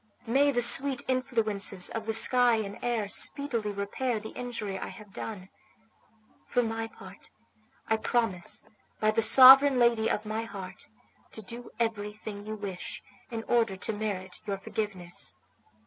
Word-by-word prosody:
May 275 +5 +2
the 245 -2 +4
sweet 270 +2 +7
influences 215 -7 +1
of 225 -1 -6
the 225 - -1
sky 245 +1 +5
and 205 -2 -5
air 235 -4 -2
speedily 235 0 -3
repair 205 +4 -3
the 220 +1 -9
injury 215 -6 -5
I - - -6
have 210 -2 -13
done! 195 -4 -7 1.0
For 245 - +1
my 225 0 -4
part, 195 -3 -14 0.6
I 220 - +1
promise 220 -6 -2 0.3
by 215 0 +2
the 220 - +1
sovereign 265 +3 +8
lady 235 -2 +2
of 210 - -2
my 215 +1 -3
heart 195 -4 -9 0.5
to 220 - -8
do 235 +4 -8
everything 210 -2 -4
you 215 - -4
wish 200 -4 -7 0.3
in 225 -2 -5
order 225 -5 0
to 220 - -4
merit 195 -3 -5
your 200 -1 -2
forgiveness." 195 -3 -5
220 Hz, 150 wpm, -28 LUFS, 200-240 Hz, 1.0 s, sovereign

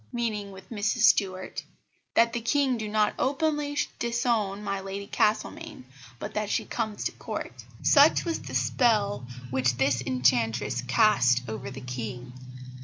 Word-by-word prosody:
meaning 220 -5 -2
with 190 0 -12
Mrs 215 +2 -1
Stuart; 190 -3 +2 0.5
that 230 0 +4
the 240 - -2
King 265 +2 +2
do 220 -2 -4
not 210 0 +2
openly 290 +1 0 0.2
disown 235 -4 0
my 195 -1 -2
Lady 195 +1 -6
Castlemaine, 210 - -1 0.3
but 205 - -6
that 210 -1 -2
she - - 0
comes 220 -3 -3
to - - -1
Court." - - -7 0.2
Such 290 +1 +5
was 330 - -1
the - - -7
spell 205 - +1 0.2
which 125 -2 +1
this 135 -2 +2
enchantress 125 -2 +1
cast 125 - +3
over 110 +4 -5
the 135 0 -8
King. 125 0 -6
205 Hz, 145 wpm, -27 LUFS, -, 0.5 s, Such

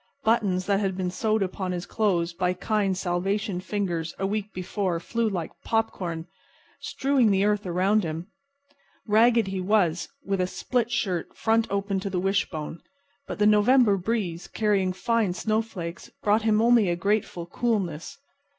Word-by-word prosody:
Buttons 205 -6 +2
that 200 -1 +2
had 190 -2 -1
been 180 -1 -1
sewed 215 +2 +1
upon 185 0 -3
his 175 0 -4
clothes 180 -6 0
by 180 +1 0
kind 195 0 0
Salvation 190 +2 -1
fingers 180 -5 -3
a 195 - -1
week 210 +1 -2
before 185 -1 -2
flew 230 +6 -1
like 175 -5 -3
popcorn, 180 -7 -1 0.5
strewing 270 -4 +1
the 195 0 +3
earth 210 -1 0
around 190 +4 +2
him. 165 +1 -4 0.8
Ragged 230 +1 +4
he 190 -1 -3
was, 180 -4 +1 0.2
with 195 -1 0
a 180 - +1
split 240 +4 -1
shirt 190 -8 -2
front 225 0 +2
open 200 0 -1
to 200 +1 -4
the 185 -1 -1
wishbone; 175 -4 -2 0.5
but - - -5
the 210 - +2
November 210 +1 +5
breeze, 185 -3 -2
carrying 200 -4 +1
fine 225 0 0
snowflakes, 215 -5 -3
brought 210 +2 +3
him 215 0 +2
only 235 -5 +5
a 175 - +1
grateful 195 -1 -1
coolness. 195 - -2
195 Hz, 155 wpm, -26 LUFS, 180-215 Hz, 0.8 s, November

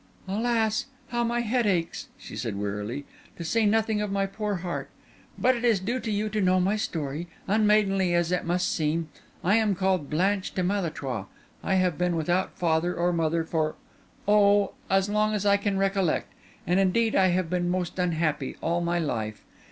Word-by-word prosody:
"Alas, 220 +3 0 0.2
how 240 -1 0
my 235 +1 0
head 235 0 +1
aches!" 175 -4 -1
she - - -10
said 110 -2 -3
wearily—"to 105 - -6
say 220 +6 +2
nothing 220 0 +2
of 210 -1 -2
my 195 0 +1
poor 205 +1 -3
heart! 175 -1 -4 0.5
But 255 0 +3
it 240 - -5
is 230 -5 +4
due 235 +7 -2
to 230 - -5
you 210 0 0
to 210 0 -1
know 185 0 +3
my 190 +3 +2
story, 160 -5 -3 0.2
unmaidenly 200 -3 +3
as 175 0 +1
it 180 - 0
must 180 +1 0
seem. 160 0 -1 0.3
I 200 +5 +4
am 215 -3 +2
called 185 -5 0
Blanche 190 +5 0
de 185 - 0
Malétroit; 155 - -2 0.4
I 190 - +1
have 180 -4 +1
been 180 -1 +1
without 175 +4 0
father 170 +1 +1
or 175 +1 +1
mother 165 0 +1
for—oh! 200 +6 +1
for - - -10 0.2
as 195 0 +3
long 215 +1 +1
as 205 -1 -2
I 200 0 +5
can 200 -1 -1
recollect, 195 -3 0 0.3
and 180 +3 +2
indeed 220 +4 +2
I 190 -1 +5
have 180 -1 +1
been 175 -1 0
most 180 0 -2
unhappy 160 -6 0
all 170 +1 0
my 170 0 0
life. 110 -10 -3
185 Hz, 185 wpm, -27 LUFS, 170-210 Hz, 0.5 s, I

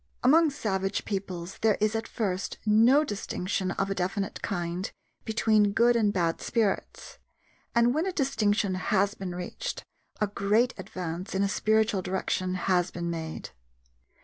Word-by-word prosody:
Among 315 +5 +6
savage 195 -8 -2
peoples 190 -3 -4
there 220 -2 +3
is 215 +1 +1
at 225 - -2
first 195 -4 -2
no 230 +7 +5
distinction 195 -5 -2
of 195 +1 -1
a - - +2
definite 195 +2 -2
kind 175 0 -3 0.4
between 215 -2 +3
good 235 +2 +4
and 215 -3 +3
bad 170 -4 0
spirits, 230 - -2 0.6
and 235 +1 +4
when 320 +6 0
a - - 0
distinction 215 - +1
has 200 +2 +1
been 185 -4 -6
reached, 340 - -5 0.4
a 210 - +3
great 210 +4 +1
advance 180 0 -5
in 195 - +2
a - - +2
spiritual 215 0 +2
direction 185 0 -1
has 180 -1 +1
been 170 -1 -4
made. 160 -1 -5
200 Hz, 150 wpm, -28 LUFS, 185-225 Hz, 0.6 s, Among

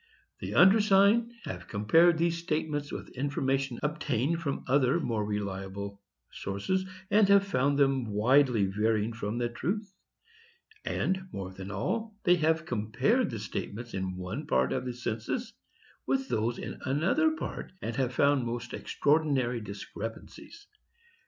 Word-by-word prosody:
"The - - -5
undersigned 205 +3 +5
have - - -6
compared 160 +12 +4
these 170 0 +1
statements 155 -3 -2
with - - -7
information 135 -1 -1
obtained 150 0 0
from 140 -4 -3
other 135 +3 +3
more 115 -9 -1
reliable 100 -1 -4 0.3
sources, 185 - -2 0.2
and 205 -1 +5
have 200 0 +6
found 140 -6 +1
them 135 -3 +3
widely 115 +1 +3
varying 105 +3 0
from 110 0 -4
the 120 0 0
truth; 195 - -3 0.9
and, 190 0 -1
more 95 -1 -5
than 95 +1 -8
all, 220 - -2
they 180 0 +5
have 160 0 +1
compared 125 - +1
the 115 - -4
statements 110 +2 -5
in 95 -1 -3
one 90 0 -5
part 65 0 +2
of 130 - -2
the 125 - -3
census 120 - -3 0.5
with 270 0 0
those 115 +3 0
in - - -6
another 170 - +2
part, - - -6
and 115 -7 -4
have 130 -2 +1
found 140 -2 +3
most 120 0 -4
extraordinary 140 -6 +1
discrepances. 110 - -8
130 Hz, 140 wpm, -29 LUFS, 110-170 Hz, 0.9 s, have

